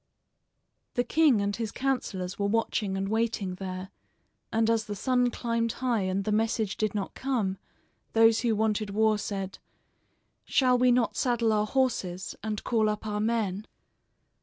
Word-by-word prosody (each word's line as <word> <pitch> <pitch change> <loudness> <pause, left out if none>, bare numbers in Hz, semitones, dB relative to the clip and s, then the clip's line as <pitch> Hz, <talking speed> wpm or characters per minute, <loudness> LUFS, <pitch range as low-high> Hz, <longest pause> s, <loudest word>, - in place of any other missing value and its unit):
The 245 - +2
king 280 -4 +3
and 200 0 -1
his 225 -2 -3
counselors 205 -9 -2
were 200 - +1
watching 205 -2 0
and 195 0 -2
waiting 220 -3 -1
there, 185 0 -6 0.6
and 225 0 +2
as 225 -1 +2
the 205 -1 -5
sun 250 +4 +2
climbed 230 -1 -1
high 245 -4 0
and 195 +1 -1
the 215 - -1
message 220 -1 0
did 215 -1 -1
not 200 -2 -3
come, 225 -8 -1 0.5
those 225 0 +5
who 230 -3 +1
wanted 215 -1 0
war 215 +1 +2
said: 195 -2 -4 0.8
"Shall 255 -2 +3
we 250 0 +5
not 245 -1 +2
saddle 235 -3 +2
our 210 0 +1
horses, 210 -9 -1
and 215 -1 -3
call 220 -3 +2
up 210 +1 -3
our 210 -1 -2
men?" 215 -3 -1
220 Hz, 160 wpm, -28 LUFS, 200-235 Hz, 0.8 s, those